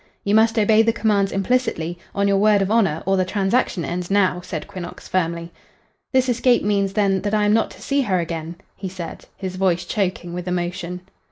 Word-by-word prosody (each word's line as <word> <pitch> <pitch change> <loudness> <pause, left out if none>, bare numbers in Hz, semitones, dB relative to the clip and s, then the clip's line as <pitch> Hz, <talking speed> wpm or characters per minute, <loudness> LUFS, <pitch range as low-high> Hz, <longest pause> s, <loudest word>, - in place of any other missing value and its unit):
"You 200 - 0
must 225 +1 +4
obey 220 0 +5
the 225 0 +3
commands 210 -3 +1
implicitly, 195 -6 -1 0.2
on 200 0 +2
your 200 0 +3
word 210 -1 +4
of 195 - -2
honor, 195 -9 +2
or 195 +1 +2
the 185 - +3
transaction 195 -1 0
ends 175 0 -4
now," 190 -3 +2
said 180 -4 -6
Quinnox, 185 -3 -8
firmly. 170 -2 -1 0.6
"This 260 -1 +3
escape 245 0 +3
means, 200 -1 +1
then, 195 -3 +2
that 210 +1 -1
I 210 -1 +2
am 205 - +3
not 225 - +2
to - - -13
see 280 0 +1
her 195 -8 +1
again," 165 0 -4 0.2
he 190 -1 -5
said, 180 -2 -8
his 185 -1 -5
voice 185 -2 +1
choking 185 -4 -2
with 180 +1 -5
emotion. 180 0 -3
195 Hz, 200 wpm, -21 LUFS, 180-210 Hz, 0.6 s, obey